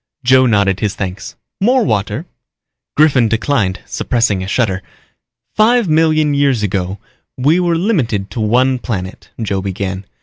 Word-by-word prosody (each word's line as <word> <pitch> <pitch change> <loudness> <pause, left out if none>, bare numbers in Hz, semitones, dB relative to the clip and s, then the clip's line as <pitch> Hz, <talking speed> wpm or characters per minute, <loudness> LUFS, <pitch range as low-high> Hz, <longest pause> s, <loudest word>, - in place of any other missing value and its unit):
Joe 130 +1 +5
nodded 100 -4 +2
his 105 -3 -2
thanks. 95 -1 -6 0.3
"More 250 +4 +3
water?" 105 - -1 0.7
Griffin 140 -6 +4
declined, 110 -4 0
suppressing 115 -6 0
a 95 - -5
shudder. 95 -3 0 0.7
"Five 230 0 +3
million 155 -1 +2
years 140 -6 +1
ago 95 -1 -2 0.4
we 145 +7 +2
were 175 -2 +1
limited 125 - -1
to 115 - -5
one 125 +4 +2
planet," 95 -7 -5
Joe 100 -4 -2
began. 95 0 -4
115 Hz, 135 wpm, -16 LUFS, 100-150 Hz, 0.7 s, Joe